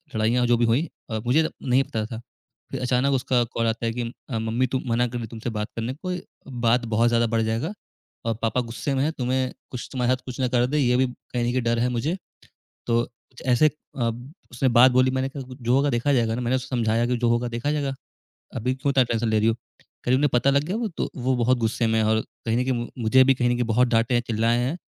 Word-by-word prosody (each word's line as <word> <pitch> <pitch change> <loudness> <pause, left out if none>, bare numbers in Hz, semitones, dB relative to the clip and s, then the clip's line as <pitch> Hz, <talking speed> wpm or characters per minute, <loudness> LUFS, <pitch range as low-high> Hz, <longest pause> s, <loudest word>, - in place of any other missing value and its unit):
लड़ाइयाँ 115 +3 +2
जो 120 0 +4
भी 120 - +2
हुईं, 125 +9 +2 0.2
अ, 110 - -2
मुझे 145 +7 +4
तब - - -2 0.2
नहीं 130 +2 +4
पता 110 -6 -3
था। 110 0 -6 0.5
फिर - - -4
अचानक 125 +2 +2
उसका 125 -2 +2
कॉल 115 0 0
आता 115 +1 -1
है 115 - +1
कि 125 - -3 0.3
अ, 115 -4 -2
"मम्मी 115 +3 0
तो 130 +1 -1
मना 120 +1 +2
कर 120 0 -5
दी 115 - -5
तुमसे 115 +2 -5
बात 105 +1 -2
करने। 115 +3 -3
कोई 180 +4 -4 0.5
बात 120 +1 +3
बहुत 115 +2 +4
ज़्यादा 115 0 +3
बढ़ 115 0 +1
जाएगा 115 - -1 0.5
और 115 - +1
पापा 115 +3 +1
गुस्से 120 +4 -3
में 135 - +1
हैं, 155 - +1
तुम्हें 130 -1 -1 0.2
कुछ 125 -3 -6
तुम्हारे 125 -1 +1
साथ 130 0 -4
कुछ 125 0 -7
ना 130 - +2
कर 125 -1 +3
दें, 150 +3 -1
ये 125 -3 +3
भी 130 - +3
कहीं 125 -1 -5
न - - 0
कहीं 130 0 0
डर 115 0 +1
है 125 +1 +2
मुझे।" 130 +9 -1 0.7
तो 115 0 +3
कुछ 125 +1 -19
ऐसे 125 +5 +5
अ, 135 -5 -3 0.4
उसने 125 +2 +1
बात 130 +1 +8
बोली। 130 +1 +4
मैंने 130 0 -1
कहा 135 -1 -7
गु 130 - -9
जो 120 +1 +1
होगा 140 +1 +3
देखा 125 +3 +1
जाएगा 115 -3 +2
ना। 125 - -3
मैंने 125 +2 +1
उसे 130 - -6
समझाया 115 -2 +1
कि, 125 0 0
"जो 120 0 +1
होगा 120 +1 +1
देखा 120 +5 -2
जाएगा। 140 -3 -1 0.6
अभी 125 +3 -1
क्यों 140 +2 0
इतना 135 -2 +4
टेंशन 115 -1 -1
ले 110 -1 +2
रही 110 - +2
हो?" 115 - +1 0.2
कह - - -22
रही, 130 - +5
"उन्हें 145 +2 +3
पता 125 +3 +3
लग 140 +1 +2
गया, 185 - -2
वो 230 -2 -1
तो 165 - -3
वो 130 0 0
बहुत 125 +2 +3
गुस्से 115 +1 0
में 110 - +1
हैं 110 - +2
और 110 0 +3 0.2
कहीं 115 0 +1
न 125 - +2
कहीं 130 0 0
मु 120 -1 -3 0.2
मुझे 130 +4 +6
भी 135 +1 +5
कहीं 120 -1 +1
न - - +2
कहीं 120 0 0
बहुत 125 +3 +3
डाँटे 115 +2 +2
हैं, 120 - +3
चिल्लाए 115 +1 +2
हैं। 135 +8 -1
125 Hz, 265 wpm, -24 LUFS, 115-130 Hz, 0.7 s, बात